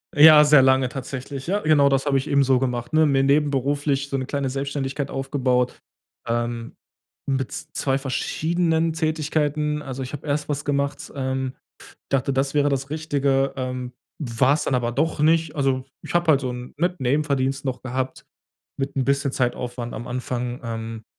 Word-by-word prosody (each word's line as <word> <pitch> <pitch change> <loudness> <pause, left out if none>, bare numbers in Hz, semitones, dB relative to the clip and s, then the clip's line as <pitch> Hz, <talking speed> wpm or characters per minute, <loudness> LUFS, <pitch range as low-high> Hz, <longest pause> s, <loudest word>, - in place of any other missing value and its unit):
Ja, 150 0 +9
sehr 150 -2 +6
lange 130 -1 +4
tatsächlich. 135 +1 -6
Ja, 200 +4 0
genau 150 -5 +4
das 135 +1 +1
habe 140 -1 +3
ich 135 +3 -2
eben 140 -1 +3
so 130 -1 +3
gemacht, 125 0 -2
ne? 155 0 +5
Mir 140 -2 +3
nebenberuflich 140 0 +1
so 140 - -1
'ne 130 - -2
kleine 140 0 -2
Selbstständigkeit 140 +1 -3
aufgebaut. 130 -2 0 0.5
Ähm, 120 0 -2 0.5
mit 135 -2 -1
2 145 -3 -2
verschiedenen 160 +4 0
Tätigkeiten. 150 -1 -1
Also, 135 0 -6
ich 130 +1 -6
habe 145 +1 -7
erst 150 +1 -1
was 145 0 -2
gemacht 140 -1 -2
ähm, 130 -1 -2 0.6
dachte, 135 0 +1
das 135 +1 0
wäre 145 -1 +3
das 135 -1 -1
Richtige, 140 -3 0
ähm, 125 -1 -4 0.3
war's 135 +2 +2
dann 130 - +1
aber 120 -1 -1
doch 155 +6 0
nicht. 160 0 +2
Also, 135 -2 +1 0.2
ich - - -7
habe 175 -1 +3
halt 140 -3 +4
so 130 -2 -2
'n, 125 0 -7
mit 175 +3 -1
Nebenverdienst 135 0 0
noch 130 -2 -3
gehabt 130 +1 -3 0.5
mit 135 0 -4
'n 135 - +1
bisschen 140 +1 +1
Zeitaufwand 125 -1 -2
am 120 +3 -6
Anfang. 125 0 -3
Ähm, 115 -1 -5
135 Hz, 170 wpm, -23 LUFS, 130-145 Hz, 0.6 s, Ja